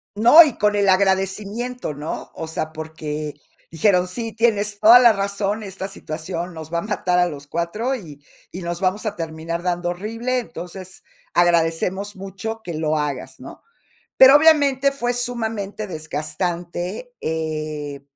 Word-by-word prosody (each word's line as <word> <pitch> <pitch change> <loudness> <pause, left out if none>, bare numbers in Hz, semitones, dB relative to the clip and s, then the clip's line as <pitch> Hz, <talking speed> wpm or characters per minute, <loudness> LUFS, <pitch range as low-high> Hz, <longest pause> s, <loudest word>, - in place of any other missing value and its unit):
No, 240 +10 +9
y 290 -6 -2
con 210 0 +2
el 200 -1 +2
agradecimiento, 195 +3 0
¿no? 150 +2 -6
O 160 - -6
sea, 160 0 -4
porque 155 -1 -5 0.4
dijeron: 180 +2 +2
"Sí, 225 +3 -5
tienes 210 -3 +1
toda 230 +3 +9
la 240 -3 +7
razón, 200 +2 -2
esta 190 -1 -6
situación 170 -1 -6
nos 160 0 -9
va 170 - +1
a - - -3
matar 185 -4 -1
a 180 0 +4
los 145 -1 -9
4, 210 - -2
y 150 - -10 0.3
y 185 - -7
nos 175 +1 -4
vamos 190 +4 0
a 210 -1 -2
terminar 165 +1 -5
dando 175 -1 -1
horrible, 230 +7 -2
entonces, 185 -4 -9 0.3
agradecemos 175 +4 +1
mucho 195 +4 -6
que 175 -5 -6
lo 155 0 0
hagas", 145 -3 -4
¿no? - - -11 0.5
Pero, 265 +2 +9
obviamente, 285 -3 +5
fue 245 -3 -1
sumamente 220 -4 -3
desgastante, 175 - -4
eh, 155 -3 -4
185 Hz, 150 wpm, -21 LUFS, 160-220 Hz, 0.5 s, No